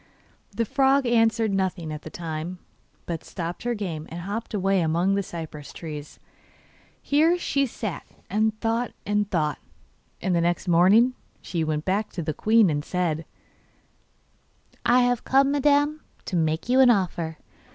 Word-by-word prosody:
The 230 - -2
frog 270 +2 +3
answered 225 -2 +2
nothing 185 -4 -1
at 150 - -6
the 155 - -9
time, 165 +2 -5 0.5
but 165 -2 -4
stopped 170 0 -5
her 240 0 -1
game 170 -7 -5
and 170 +2 -6
hopped 210 +4 -4
away 195 -1 +2
among 170 +4 +1
the 200 - +1
cypress 160 -5 -8
trees. 150 -3 -8 0.8
Here 315 +5 +3
she 275 -5 0
sat 215 -5 -5 0.2
and 215 +2 0
thought 230 +1 -1
and 205 0 0
thought, 155 -4 0 0.6
and 185 - 0
the 170 - +2
next 175 +2 0
morning 195 +9 +5 0.3
she 170 -3 -3
went 155 -1 -2
back 200 +3 0
to 170 - -3
the 155 0 -2
queen 215 +1 +4
and 145 0 -1
said: 165 -3 -1 1.6
'I 245 +1 +5
have 245 -1 +1
come, 270 +1 +3
madam, 290 +1 +2 0.2
to - - -4
make 160 +1 0
you 255 +2 +3
an 260 -2 +7
offer. 175 -7 0
195 Hz, 155 wpm, -25 LUFS, 165-235 Hz, 1.6 s, an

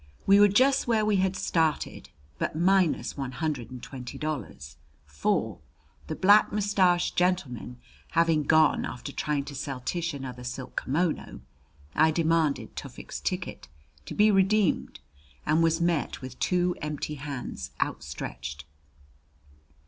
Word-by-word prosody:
We 200 +1 +6
were 205 - +8
just 260 +8 +3
where 220 -2 +2
we 210 -2 +3
had 190 0 +1
started, 160 -4 -1 0.3
but - - -2
minus 180 0 +2
one 135 -2 -4
hundred 135 -3 -3
and 125 -2 -9
twenty 125 -3 -8
dollars; 75 - -5 0.3
for, 75 0 -1 0.5
the 155 - -3
black 205 +4 +5
mustached 195 -4 +2
gentleman 160 - -1 0.4
having 165 -2 +3
gone 155 +1 +4
after 125 - -6
trying 145 -2 -1
to 145 - -8
sell 135 -1 -4
Tish 170 +3 -2
another 130 -3 -7
silk 125 +1 -6
kimono, 155 - -1 0.5
I 160 +1 +4
demanded 160 -2 +1
Tufik's - - -7
ticket - - -4 0.4
to - - -6
be 210 +1 +5
redeemed 195 - +2 0.4
and 155 +2 +3
was 165 0 +3
met 170 -3 0
with 130 -1 -9
two 180 -1 +1
empty 150 0 -3
hands, 130 - -5
outstretched. 70 0 -4
155 Hz, 135 wpm, -27 LUFS, 130-180 Hz, 0.5 s, were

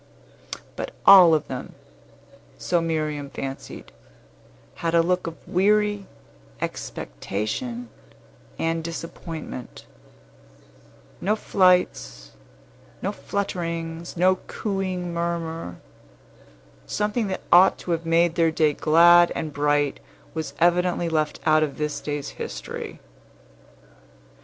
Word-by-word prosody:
But - - -6
all 180 -5 +9
of 155 - -2
them, - - -7 0.8
so 175 -1 0
Miriam 155 -3 -2
fancied, 135 0 -7 0.9
had 165 0 -1
a 165 - +5
look 180 0 0
of 165 - -6
weary 205 +1 +2 0.5
expectation 110 - -4 0.7
and 165 0 -1
disappointment, 165 -5 -7 1.4
no 205 +4 +2
flights, 180 - +1 0.7
no - - 0
flutterings, 170 -3 -4
no 185 +2 +4
cooing 185 -4 -3
murmur; 165 - -3 1.1
something 210 - -1
that 190 - -3
ought 180 +2 +7
to 175 - -6
have 165 0 0
made 165 0 +3
their 165 -1 +3
day 155 -2 +2
glad 170 +3 +6
and 155 -2 -4
bright 145 0 +1 0.3
was 155 -3 -5
evidently 175 0 +2
left 155 -2 -1
out 155 0 +5
of 150 -3 -1
this 150 -1 -3
day's 145 -1 -4
history. - - -7
165 Hz, 100 wpm, -24 LUFS, 155-180 Hz, 1.4 s, all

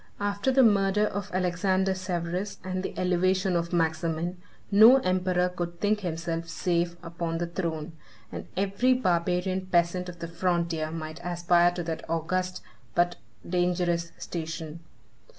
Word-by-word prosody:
After 205 +5 0
the 265 0 +5
murder 205 -1 +4
of 205 -1 -3
Alexander 185 +1 +1
Severus, 185 +1 -3
and 185 0 -3
the - - -5
elevation 185 +1 +2
of 170 0 -1
Maximin, 165 +1 -1 0.3
no 220 +6 +9
emperor 185 -4 +1
could 175 -1 -5
think 210 +2 +2
himself 165 -2 -3
safe 170 0 0
upon 165 -1 -3
the 175 - -1
throne, 165 -2 -3 0.4
and - - -7
every 200 +7 +2
barbarian 185 -2 0
peasant 180 0 +1
of 175 - -9
the 170 0 -5
frontier 170 -2 -1
might 155 0 -6
aspire 175 0 +3
to 175 - -3
that 160 -1 -4
august, 180 +3 -1 0.3
but 175 0 +2 0.3
dangerous 175 -1 0
station. 160 -1 -5
175 Hz, 135 wpm, -27 LUFS, 170-185 Hz, 0.4 s, no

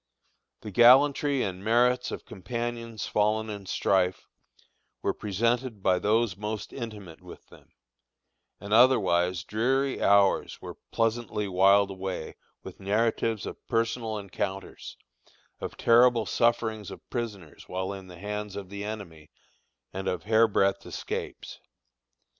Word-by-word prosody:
The 105 - -7
gallantry 135 +5 +5
and 95 -1 -4
merits 125 +3 +2
of - - -7
companions 115 +3 -5
fallen 110 +1 0
in 100 -2 -8
strife 90 -1 +1 0.8
were - - +1
presented 115 +2 -1
by 90 -1 +3
those 110 -1 +1
most 105 +1 -5
intimate 105 -9 -8
with - - -13
them; - - -19 0.9
and 100 +2 -5
otherwise 95 -8 +4
dreary 130 +7 0
hours 100 -1 +3
were - - -9
pleasantly 115 -2 -1
whiled 100 +2 +4
away 95 -3 -5 0.3
with - - -10
narratives 110 +2 0
of - - -8
personal 115 -1 -1
encounters, 95 -1 -5 0.6
of - - -6
terrible 120 -1 +5
sufferings 110 -3 0
of - - -11
prisoners 105 - -6
while 95 +2 -3
in 95 -1 -9
the 90 -1 -12
hands 105 +1 -5
of 100 -2 -7
the 100 0 -5
enemy, 95 -8 -7 0.6
and 95 0 -4
of 90 -2 -2
hair 110 +2 +4
breadth 100 -2 +1
escapes. - - -6
105 Hz, 125 wpm, -27 LUFS, 95-115 Hz, 0.9 s, gallantry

